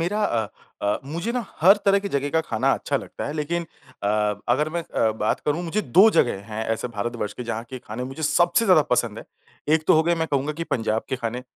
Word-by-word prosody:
मेरा 205 +6 0
अ, 115 - 0 0.4
अ, 100 0 +1
मुझे 170 +11 -3
ना 245 -1 -2 0.2
हर 190 +5 +7
तरह 200 0 +5
की 200 0 -4
जगह 140 -3 -1
का 160 - +2
खाना 115 -9 0
अच्छा - - -2
लगता - - -6
है, 145 - -3
लेकिन 165 +3 -2 0.4
अ, 105 0 0
अगर 150 +1 +2
मैं 170 +2 -3
अ, 110 -8 0
बात 105 - +1
करूँ, 155 +4 0
मुझे 175 +5 -1 0.2
2 215 +3 +10
जगह 100 - +1
हैं 110 +1 -3
ऐसे 125 - -5
भारतवर्ष 115 -1 -3
के - - -7
जहाँ 115 0 -4
के 130 - -6
खाने 120 +1 -6
मुझे 135 +5 -7
सबसे 175 +8 +3
ज़्यादा 185 -7 +6
पसंद 115 -3 -1
है। - - -9 0.5
एक 155 -1 0
तो - - +6
हो 160 - +5
गया 170 +1 +2
मैं 160 0 0
कहूँगा 140 +2 0
कि - - -1
पंजाब 110 -6 -1
के 130 - -1
खाने। 120 0 -4
145 Hz, 240 wpm, -24 LUFS, 115-170 Hz, 0.5 s, 2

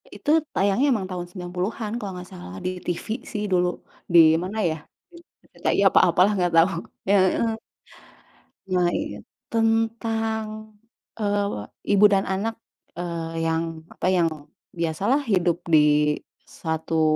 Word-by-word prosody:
Itu - - -5 0.2
tayangnya 200 +7 +2
memang 205 -6 0
tahun 180 -1 -4
90-an 185 +4 -4
kalau 205 -4 -5
nggak 180 0 -9
salah 90 +1 -9
di - - +1 0.2
TV 175 - -3 0.2
sih 210 -4 -3
dulu. 180 -1 +3 0.5
Di 170 - +9 0.2
mana 195 +4 -5
ya, 155 - -2 0.4
di 345 - -14 0.3
RCTI - - -1
atau - - +5
apalah 180 +4 +4
nggak 175 -1 +1
tau 165 +3 +6 0.4
ya, 200 - +5 0.2
heeh. 230 -1 +1 1.2
Nah, 180 -1 +2
iya - - -3 0.3
tentang, 225 -1 -1 0.4
eee, 205 - -1 0.3
ibu 205 - +7
dan 195 -1 +3
anak, 205 +4 -1 0.4
eee, 165 -1 -4
yang 165 0 -2
apa, - - -3
yang 170 -3 +3 0.5
biasalah 200 - 0
hidup 180 -6 +2
di 150 -2 +4 0.3
satu, 160 0 -2
185 Hz, 135 wpm, -24 LUFS, 165-215 Hz, 1.2 s, Di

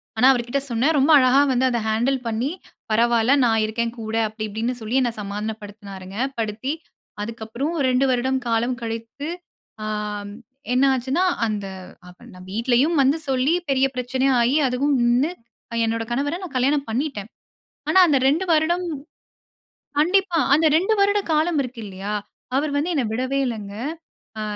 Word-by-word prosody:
ஆனா, 220 - +3
அவர்கிட்ட 240 +3 -1
சொன்னேன். 270 +8 +2
ரொம்ப 280 +4 +4
அழகா 255 +2 +5
வந்து 255 +1 +2
அத 240 -1 0
ஹேண்டில் 240 +5 +1
பண்ணி, 235 +6 -1 0.4
பரவாயில்ல 235 +3 +3
நான் 225 -2 +3
இருக்கேன். 230 +1 -2
கூட, 220 0 -4
அப்டி 215 +1 -7
இப்டின்னு 225 +4 -2
சொல்லி 220 +3 -3
என்ன 240 - +1
சமாதானப்படுத்தினாருங்க. 205 -2 -7 0.2
படுத்தி 225 +5 -2 0.5
அதுக்கப்புறம் 230 +7 -4 0.2
2 255 +1 +3
வருடம் 260 +1 +1
காலம் 235 +2 +1
கழித்து 230 +5 -5 0.6
ஆ - - -3 0.9
என்ன 255 +2 +3
ஆச்சுனா 265 +7 0 0.2
அந்த 210 -3 -2 0.4
அவன 180 +7 -15
வ - - -12
வீட்லயும் 245 - +2
வந்து 275 +4 +3
சொல்லி 265 +3 +2 0.2
பெரிய 270 0 +3
பிரச்சனை 255 +1 -1
ஆயி, 240 +4 +2
அதுவும் 275 +4 +1
நின்னு 245 +5 +3 0.4
அ - - -2
என்னோட 225 0 -1
கணவர 285 +7 -1
நான் 345 -6 -8
கல்யாணம் 280 +3 +1
பண்ணிட்டேன். 230 -3 -3 0.6
ஆனா, 375 - +5
அந்த 290 -4 +3
2 315 +7 +2
வருடம் 340 +3 +2 1.1
கண்டிப்பா. 360 +2 +2
அந்த 315 +2 +4
2 375 +7 +3
வருட 405 +1 +3
காலம் 310 0 +2
இருக்கில்லையா? 210 -5 -6 0.4
அவரு 290 +2 +1
வந்து 330 +5 0
என்ன 275 - +1
விடவே 260 +3 -1
இல்லங்க. 210 -4 -5 0.7
அ - - -3
250 Hz, 145 wpm, -22 LUFS, 225-280 Hz, 1.1 s, அழகா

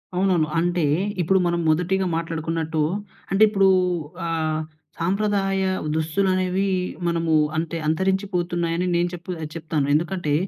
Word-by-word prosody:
అవునవును. 180 -4 +2
అంటే 175 0 +1 0.4
ఇప్పుడు 190 +3 +3
మనం 170 0 0
మొదటిగా 180 +4 +1
మాట్లాడుకున్నట్టు 165 -1 -2 0.5
అంటే 195 +2 +1
ఇప్పుడు 195 -2 +3 0.6
ఆహ్, 160 -1 -1 0.4
సాంప్రదాయ 195 +1 +1 0.3
దుస్తులనేవి 185 +4 +1 0.4
మనము 165 -1 +1 0.2
అంటే 165 +1 -2
అంతరించిపోతున్నాయని 175 -1 0
నేను 175 +1 +2
చెప్పు 175 +1 -7 0.2
చెప్తాను. 155 -3 -1
ఎందుకంటే 165 0 0
175 Hz, 105 wpm, -23 LUFS, 165-190 Hz, 0.6 s, ఇప్పుడు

